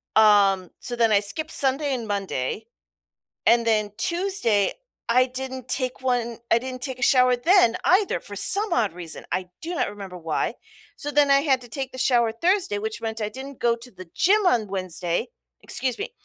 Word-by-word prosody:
um, 200 Hz, -4 st, +5 dB
so 245 Hz, -, -3 dB
then 230 Hz, -2 st, +3 dB
I 200 Hz, -1 st, +4 dB
skipped 310 Hz, +11 st, -3 dB
Sunday 275 Hz, +1 st, 0 dB
and 230 Hz, -3 st, -5 dB
Monday, 195 Hz, -11 st, -3 dB, 0.8 s
and 235 Hz, 0 st, +5 dB
then 215 Hz, -2 st, +1 dB
Tuesday, 340 Hz, -, +1 dB, 0.4 s
I 250 Hz, +2 st, +4 dB
didn't 260 Hz, 0 st, -6 dB
take 255 Hz, -1 st, -1 dB
one 240 Hz, -3 st, -1 dB
I 230 Hz, -, +5 dB
didn't 255 Hz, +1 st, -7 dB
take 260 Hz, -2 st, -4 dB
a -, -, -11 dB
shower 250 Hz, -1 st, +4 dB
then 285 Hz, -, +4 dB
either 385 Hz, +2 st, +3 dB
for -, -, -10 dB
some 410 Hz, 0 st, +2 dB
odd 220 Hz, -, +1 dB
reason, 170 Hz, -2 st, -8 dB
I 180 Hz, -1 st, -2 dB
do 345 Hz, +2 st, -4 dB
not -, -, 0 dB
remember 195 Hz, -3 st, -8 dB
why. 160 Hz, -2 st, -2 dB, 0.4 s
So 290 Hz, -, -4 dB
then, 290 Hz, -1 st, +4 dB
I 275 Hz, 0 st, +6 dB
had 270 Hz, -4 st, +2 dB
to 245 Hz, -, -12 dB
take 265 Hz, +2 st, -5 dB
the 260 Hz, -, -9 dB
shower 240 Hz, -3 st, +2 dB
Thursday, 345 Hz, -, +1 dB
which 220 Hz, +1 st, -4 dB
meant 225 Hz, 0 st, -4 dB
I 210 Hz, -, -1 dB
didn't 265 Hz, +3 st, -9 dB
go 235 Hz, -1 st, +2 dB
to 240 Hz, +2 st, -13 dB
the 185 Hz, -2 st, -12 dB
gym 415 Hz, +3 st, +3 dB
on 235 Hz, -10 st, +3 dB
Wednesday 185 Hz, -3 st, -2 dB, 0.3 s
excuse 250 Hz, -1 st, -3 dB
me. -, -, -4 dB
240 Hz, 190 wpm, -24 LUFS, 210-270 Hz, 0.8 s, I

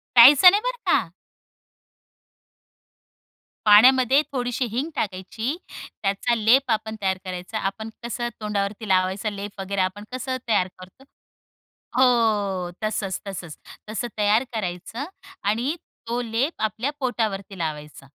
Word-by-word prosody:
प्यायचं 280 Hz, +9 st, +10 dB
नाही 410 Hz, +1 st, +2 dB
बरं -, -, -1 dB
का. 170 Hz, -6 st, +2 dB, 2.5 s
पाण्यामध्ये 255 Hz, +5 st, +7 dB
थोडीशी 245 Hz, -1 st, -1 dB
हिंग 275 Hz, +7 st, -2 dB
टाकायची, 220 Hz, -, -3 dB, 0.5 s
त्याचा 200 Hz, +4 st, +1 dB
लेप 235 Hz, +5 st, +3 dB
आपण 220 Hz, 0 st, -1 dB
तयार 190 Hz, -1 st, 0 dB
करायचा, 185 Hz, +4 st, -5 dB
आपण 215 Hz, +3 st, -3 dB
कसं 240 Hz, 0 st, -3 dB
तोंडावरती 210 Hz, 0 st, -3 dB
लावायचा 190 Hz, +3 st, +1 dB
लेप 200 Hz, 0 st, -7 dB
वगैरे 195 Hz, 0 st, -2 dB
आपण 185 Hz, +3 st, -1 dB
कसं 255 Hz, 0 st, -3 dB
तयार 185 Hz, -4 st, +2 dB
करतो, 185 Hz, +9 st, -15 dB, 0.9 s
हो 210 Hz, -8 st, +2 dB
तसंच 195 Hz, -3 st, -2 dB
तसंच 175 Hz, -5 st, -7 dB, 0.3 s
तसं 225 Hz, +3 st, -3 dB
तयार 210 Hz, +4 st, +3 dB
करायचं 210 Hz, +6 st, -4 dB, 0.4 s
आणि 245 Hz, +10 st, 0 dB, 0.3 s
तो 240 Hz, +1 st, -1 dB
लेप 235 Hz, +7 st, -2 dB
आपल्या 220 Hz, +6 st, -1 dB
पोटावरती 210 Hz, -6 st, -2 dB
लावायचा. 150 Hz, -3 st, -5 dB
215 Hz, 115 wpm, -24 LUFS, 195-245 Hz, 2.5 s, प्यायचं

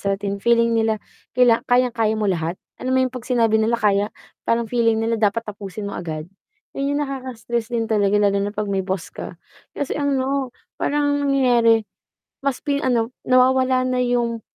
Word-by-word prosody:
sa 200 Hz, -, -1 dB
'tin, 200 Hz, 0 st, -4 dB
feeling 235 Hz, 0 st, +3 dB
nila 220 Hz, -1 st, +2 dB, 0.4 s
kila 245 Hz, -2 st, +5 dB
kayang-kaya 240 Hz, -3 st, +2 dB
mo 215 Hz, -, -1 dB
lahat. 170 Hz, -1 st, -2 dB, 0.2 s
Alam 255 Hz, -, -2 dB
mo -, -, +4 dB
'yong 255 Hz, -, -3 dB
'pag 250 Hz, -1 st, -7 dB
sinabi 230 Hz, -3 st, +3 dB
nila 225 Hz, +2 st, +2 dB
kaya, 205 Hz, -1 st, +2 dB, 0.4 s
parang 230 Hz, 0 st, +2 dB
feeling 230 Hz, -1 st, +2 dB
nila 230 Hz, 0 st, +1 dB
dapat 225 Hz, +2 st, +1 dB
tapusin 205 Hz, 0 st, -7 dB
mo -, -, -6 dB
agad. 155 Hz, -3 st, -5 dB, 0.5 s
'Yon 280 Hz, +1 st, 0 dB
'yong -, -, 0 dB
nakaka-stress 240 Hz, -4 st, -4 dB
din 230 Hz, -1 st, 0 dB
talaga 205 Hz, -2 st, +2 dB
lalo 200 Hz, -1 st, +3 dB
na 200 Hz, +1 st, -1 dB
'pag 210 Hz, -1 st, -2 dB
may 195 Hz, -, +1 dB
boss 185 Hz, -2 st, -3 dB
ka. -, -, -8 dB, 0.4 s
Kasi, 285 Hz, -, -2 dB
ano, 275 Hz, -1 st, 0 dB, 0.3 s
parang 285 Hz, -1 st, +1 dB
nangyayari, 240 Hz, -5 st, +4 dB, 0.6 s
mas 275 Hz, -2 st, 0 dB
pi 285 Hz, -1 st, 0 dB
ano, 235 Hz, -2 st, +1 dB, 0.2 s
nawawala 255 Hz, 0 st, +4 dB
na 255 Hz, 0 st, 0 dB
'yong 240 Hz, -2 st, 0 dB
230 Hz, 175 wpm, -21 LUFS, 210-255 Hz, 0.6 s, kila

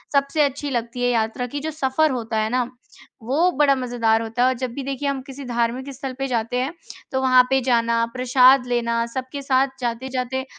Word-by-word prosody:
सबसे 280 Hz, +2 st, +2 dB
अच्छी 285 Hz, +1 st, -3 dB
लगती 240 Hz, 0 st, -3 dB
है 245 Hz, -, +3 dB
यात्रा 225 Hz, +1 st, -1 dB
की, 285 Hz, +4 st, -5 dB
जो 315 Hz, +2 st, -4 dB
सफ़र 305 Hz, +1 st, +1 dB
होता 230 Hz, -3 st, -3 dB
है 215 Hz, 0 st, 0 dB
ना 250 Hz, 0 st, 0 dB, 0.5 s
वो 315 Hz, +10 st, +2 dB
बड़ा 290 Hz, -2 st, +5 dB
मज़ेदार 240 Hz, -3 st, +1 dB
होता 225 Hz, +2 st, -3 dB
है -, -, +5 dB
और 260 Hz, -, +2 dB
जब 255 Hz, -1 st, -3 dB
भी 280 Hz, -, -5 dB
देखिए 275 Hz, +1 st, -3 dB
हम 270 Hz, -1 st, -2 dB
किसी 270 Hz, +1 st, -10 dB
धार्मिक 240 Hz, +3 st, -1 dB
स्थल 265 Hz, 0 st, -6 dB
पे 270 Hz, -, -1 dB
जाते 235 Hz, 0 st, -1 dB
हैं, 265 Hz, +6 st, -1 dB, 0.4 s
तो 265 Hz, 0 st, 0 dB
वहाँ 255 Hz, -1 st, +6 dB
पे 265 Hz, 0 st, +3 dB
जाना, 230 Hz, -2 st, +2 dB
प्रसाद 255 Hz, +1 st, +5 dB
लेना, 235 Hz, -1 st, 0 dB
सबके 260 Hz, +4 st, -6 dB
साथ 270 Hz, 0 st, +2 dB
जाते-जाते 255 Hz, +2 st, -3 dB
255 Hz, 205 wpm, -22 LUFS, 235-270 Hz, 0.5 s, वहाँ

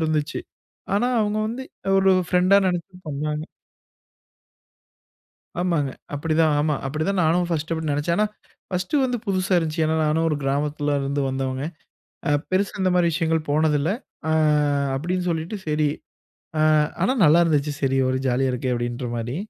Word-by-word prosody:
இருந்துச்சு. 155 Hz, -2 st, -1 dB, 0.5 s
ஆனா 240 Hz, +5 st, +2 dB
அவுங்க 210 Hz, 0 st, 0 dB
வந்து 240 Hz, +4 st, -5 dB, 0.3 s
ஒரு 195 Hz, 0 st, +5 dB, 0.2 s
ஃப்ரெண்டா 180 Hz, +2 st, +4 dB
நெனச்சு 180 Hz, 0 st, -2 dB
பண்ணாங்க. 150 Hz, +1 st, -2 dB, 2.2 s
ஆமாங்க. 165 Hz, -6 st, 0 dB, 0.2 s
அப்டித்தான் 155 Hz, +1 st, +2 dB
ஆமா, 150 Hz, 0 st, +1 dB
அப்டித்தான் 155 Hz, +7 st, -1 dB
நானும் 175 Hz, +2 st, +2 dB
ஃபர்ஸ்ட் 160 Hz, 0 st, -2 dB
அப்டி 160 Hz, -2 st, -2 dB
நெனச்சேன். 145 Hz, +4 st, 0 dB
ஆனா, 210 Hz, -, +3 dB, 0.4 s
ஃபர்ஸ்ட் 180 Hz, +7 st, -2 dB
வந்து 250 Hz, -1 st, -1 dB
புதுசா 185 Hz, -1 st, 0 dB
இருந்துச்சு. 160 Hz, -1 st, -1 dB
ஏன்னா 160 Hz, +1 st, +1 dB
நானும் 160 Hz, +2 st, +1 dB
ஒரு 150 Hz, -, 0 dB
கிராமத்துலருந்து 145 Hz, 0 st, -1 dB
வந்தவங்க. 130 Hz, 0 st, -2 dB, 0.7 s
அ -, -, +2 dB, 0.2 s
பெருசா 190 Hz, +1 st, 0 dB
இந்த 185 Hz, -, +3 dB
மாரி 175 Hz, -1 st, +3 dB
விஷயங்கள் 160 Hz, -1 st, 0 dB
போனதில்ல. 150 Hz, +1 st, +2 dB, 0.4 s
ஆ -, -, +2 dB, 0.6 s
அப்டின்னு 180 Hz, +5 st, -2 dB
சொல்லிட்டு 165 Hz, +5 st, -3 dB
சரி, 150 Hz, -1 st, +1 dB, 0.7 s
அ -, -, +2 dB, 0.4 s
ஆனா 255 Hz, -, +3 dB
நல்லா 165 Hz, +3 st, +6 dB
இருந்துச்சு, 150 Hz, -2 st, +1 dB
சரி 135 Hz, -1 st, +2 dB
ஒரு 130 Hz, 0 st, 0 dB
ஜாலியா 130 Hz, +1 st, +1 dB
இருக்கே! 125 Hz, +1 st, -2 dB
அப்டின்ற 120 Hz, +1 st, -3 dB
மாரி. 120 Hz, +4 st, -3 dB
155 Hz, 140 wpm, -23 LUFS, 145-180 Hz, 2.2 s, நல்லா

